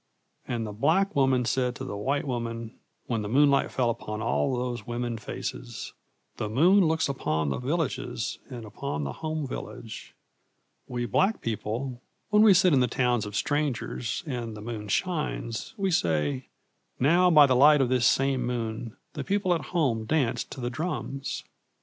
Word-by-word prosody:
And 115 Hz, -2 st, -2 dB
the 105 Hz, -, -5 dB
black 160 Hz, -, +2 dB
woman 130 Hz, -3 st, +3 dB
said 125 Hz, 0 st, 0 dB
to 130 Hz, -, -6 dB
the 115 Hz, -6 st, -5 dB
white 135 Hz, +9 st, -1 dB
woman 115 Hz, -2 st, -4 dB, 0.3 s
when 115 Hz, -3 st, -1 dB
the 105 Hz, -, -4 dB
moonlight 140 Hz, +3 st, +4 dB
fell 120 Hz, -2 st, +1 dB
upon 105 Hz, -1 st, -5 dB
all 110 Hz, -, 0 dB
those 120 Hz, -3 st, -3 dB
women 120 Hz, -1 st, -3 dB
faces, -, -, -6 dB, 0.4 s
'The 105 Hz, -, -2 dB
moon 175 Hz, -, +5 dB
looks 160 Hz, -1 st, +1 dB
upon 80 Hz, -, -1 dB
the -, -, -2 dB
villages 125 Hz, -, -2 dB
and 120 Hz, -4 st, -7 dB
upon 105 Hz, -, -4 dB
the 70 Hz, -, -3 dB
home 155 Hz, -1 st, -3 dB
village. 115 Hz, -3 st, -8 dB, 0.7 s
We 120 Hz, -1 st, -2 dB
black 190 Hz, -, +2 dB
people, 120 Hz, +3 st, -3 dB, 0.3 s
when 210 Hz, 0 st, +6 dB
we 215 Hz, -3 st, +7 dB
sit 180 Hz, -2 st, +5 dB
in 135 Hz, -, +5 dB
the 125 Hz, -, +3 dB
towns 120 Hz, -3 st, +1 dB
of 105 Hz, -, -7 dB
strangers 135 Hz, -3 st, -1 dB
and 120 Hz, -6 st, -4 dB
the -, -, -8 dB
moon 110 Hz, -1 st, -5 dB
shines, 150 Hz, -, -2 dB
we 195 Hz, -2 st, 0 dB
say, 75 Hz, -, 0 dB, 0.5 s
"Now 175 Hz, +7 st, +5 dB
by 150 Hz, -4 st, +8 dB
the 130 Hz, -2 st, +3 dB
light 145 Hz, +3 st, +7 dB
of 130 Hz, -3 st, +2 dB
this 125 Hz, -1 st, +3 dB
same 135 Hz, -1 st, +2 dB
moon 115 Hz, -2 st, -3 dB, 0.2 s
the -, -, -4 dB
people 195 Hz, -2 st, +1 dB
at 165 Hz, -, -2 dB
home 130 Hz, -11 st, 0 dB
dance 140 Hz, -2 st, +1 dB
to -, -, -10 dB
the 120 Hz, -1 st, -2 dB
drums!" 140 Hz, -2 st, -4 dB
125 Hz, 170 wpm, -27 LUFS, 115-150 Hz, 0.7 s, by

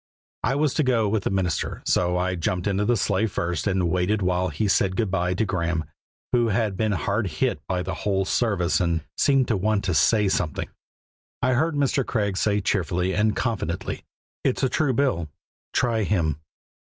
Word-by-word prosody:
I 130 Hz, +4 st, +1 dB
was 145 Hz, -1 st, +1 dB
to 155 Hz, -, +1 dB
go 120 Hz, -5 st, +2 dB
with 105 Hz, -1 st, -1 dB
the -, -, +2 dB
minister, 95 Hz, -5 st, -1 dB
so 90 Hz, 0 st, +2 dB
I 90 Hz, +1 st, 0 dB
jumped 90 Hz, +1 st, -2 dB
into 100 Hz, 0 st, +1 dB
the 120 Hz, +2 st, +2 dB
sleigh 105 Hz, +2 st, +1 dB
first 85 Hz, -3 st, -2 dB
and 95 Hz, -3 st, +1 dB
waited 90 Hz, +4 st, +1 dB
while 90 Hz, 0 st, +1 dB
he 110 Hz, -, -1 dB
said 95 Hz, -1 st, +2 dB
good 110 Hz, -3 st, 0 dB
by 90 Hz, -1 st, 0 dB
to 110 Hz, -, +1 dB
Graeme, 85 Hz, -4 st, -1 dB, 0.5 s
who 120 Hz, -1 st, +3 dB
had 105 Hz, -2 st, 0 dB
been 110 Hz, +1 st, 0 dB
hard 100 Hz, +4 st, -1 dB
hit 75 Hz, -4 st, -1 dB
by 90 Hz, -1 st, -1 dB
the -, -, -3 dB
whole 95 Hz, -2 st, -1 dB
service 95 Hz, -5 st, +1 dB
and 85 Hz, -2 st, +1 dB
seemed 135 Hz, -3 st, +3 dB
to 115 Hz, -, +2 dB
want 105 Hz, +1 st, +1 dB
to 95 Hz, -2 st, 0 dB
say 105 Hz, +7 st, +3 dB
something. 90 Hz, -5 st, -1 dB, 0.7 s
I 130 Hz, 0 st, +3 dB
heard 160 Hz, +5 st, +1 dB
Mr. 140 Hz, -1 st, +1 dB
Craig 105 Hz, -5 st, -1 dB
say 105 Hz, +1 st, +1 dB
cheerfully 90 Hz, -1 st, 0 dB
and 105 Hz, -1 st, +2 dB
confidently: 100 Hz, -8 st, -2 dB, 0.4 s
"It's 130 Hz, -, 0 dB
a 130 Hz, -, +3 dB
true 145 Hz, -2 st, +1 dB
bill: 115 Hz, -, 0 dB, 0.4 s
try 115 Hz, -3 st, +1 dB
Him." 85 Hz, -7 st, 0 dB
100 Hz, 190 wpm, -24 LUFS, 90-115 Hz, 0.7 s, who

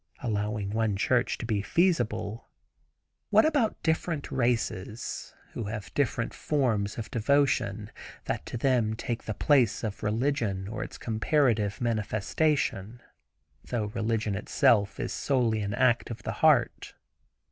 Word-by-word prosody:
Allowing 105 Hz, -3 st, -2 dB
one 110 Hz, -1 st, 0 dB
church 125 Hz, +5 st, +1 dB
to -, -, -5 dB
be 110 Hz, -3 st, 0 dB
feasible, 115 Hz, -, 0 dB, 0.8 s
what -, -, +5 dB
about 285 Hz, -8 st, +1 dB
different 160 Hz, -2 st, -1 dB
races, 115 Hz, -3 st, -2 dB, 0.2 s
who 115 Hz, -, -4 dB
have 105 Hz, 0 st, -6 dB
different 120 Hz, -4 st, 0 dB
forms 115 Hz, -9 st, 0 dB
of 115 Hz, -, -6 dB
devotion 115 Hz, -4 st, +1 dB, 0.3 s
that -, -, -2 dB
to -, -, -4 dB
them 120 Hz, -4 st, +2 dB
take 115 Hz, +1 st, -4 dB
the 110 Hz, -, -3 dB
place 130 Hz, -8 st, +3 dB
of 105 Hz, -2 st, -4 dB
religion 110 Hz, -3 st, -1 dB
or 105 Hz, 0 st, -4 dB
its -, -, -9 dB
comparative 110 Hz, -3 st, +1 dB
manifestation, 115 Hz, 0 st, 0 dB, 0.7 s
though 115 Hz, -4 st, -2 dB
religion 110 Hz, -2 st, -1 dB
itself 100 Hz, +1 st, +2 dB
is -, -, -3 dB
solely 120 Hz, -6 st, +1 dB
an 100 Hz, 0 st, -2 dB
act 125 Hz, -2 st, +2 dB
of 115 Hz, -, -7 dB
the -, -, -2 dB
heart. -, -, +3 dB
115 Hz, 130 wpm, -28 LUFS, 105-130 Hz, 0.8 s, what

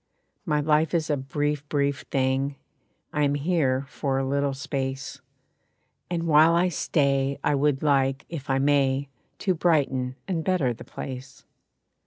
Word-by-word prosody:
My 150 Hz, -2 st, +2 dB
life 155 Hz, +2 st, +2 dB
is 160 Hz, -2 st, 0 dB
a 145 Hz, -, +1 dB
brief, 145 Hz, +1 st, -2 dB
brief 140 Hz, -2 st, 0 dB
thing, 135 Hz, +1 st, 0 dB, 0.6 s
I 150 Hz, -, 0 dB
am 145 Hz, -1 st, +2 dB
here 140 Hz, -4 st, +1 dB
for 135 Hz, -1 st, -2 dB
a 135 Hz, -, 0 dB
little 140 Hz, 0 st, 0 dB
space. 135 Hz, -2 st, -4 dB, 0.9 s
And 170 Hz, -1 st, -1 dB
while 160 Hz, +1 st, +6 dB
I 180 Hz, +2 st, +3 dB
stay 140 Hz, -4 st, +1 dB
I 145 Hz, -, +2 dB
would 140 Hz, 0 st, +1 dB
like, 135 Hz, -2 st, +2 dB
if 145 Hz, -6 st, -7 dB
I 135 Hz, -, +2 dB
may, 140 Hz, -1 st, +2 dB, 0.3 s
To 190 Hz, -, +1 dB
brighten 140 Hz, -7 st, +1 dB
and 170 Hz, -4 st, -1 dB
better 170 Hz, -10 st, +1 dB
the 115 Hz, -, -11 dB
place. 130 Hz, -1 st, -8 dB
140 Hz, 150 wpm, -25 LUFS, 135-155 Hz, 0.9 s, while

